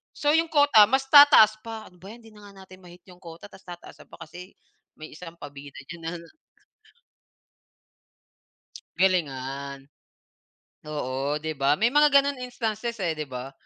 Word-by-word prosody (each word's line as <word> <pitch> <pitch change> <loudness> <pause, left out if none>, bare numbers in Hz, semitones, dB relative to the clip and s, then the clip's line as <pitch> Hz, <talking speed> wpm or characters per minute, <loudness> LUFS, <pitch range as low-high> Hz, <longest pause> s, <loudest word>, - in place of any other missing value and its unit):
So, 295 0 0
'yong 325 0 +1
quota 285 -8 +5
mas 265 +1 0
tataas 285 -8 +7
pa. 225 -1 -9
"Ano 180 - -23
ba 195 - -12
'yan 235 - -16
'di 225 - -17
na 205 -1 -15
nga 195 -1 -15
natin 185 0 -16
ma-hit 175 0 -16
'yong 180 0 -17
quota 170 +3 -12
tas 190 - -16
tataasan 175 -1 -13
pa - - -15
kasi 180 +4 -13 0.4
may 155 0 -11
isang 170 0 -11
pabida 140 0 -12
diyan 170 -1 -10
na" - - -3 2.9
Galingan. 140 -6 -2 1.0
Oo, 145 0 -4
di 155 +1 -5
ba, 140 +1 +1
may 235 +3 +2
mga 295 +1 +4
ganon 280 -1 +2
instances, 235 -2 -5
eh, 170 -4 -2
di 150 -2 -6
ba? 130 +1 -8
185 Hz, 160 wpm, -24 LUFS, 150-230 Hz, 2.9 s, tataas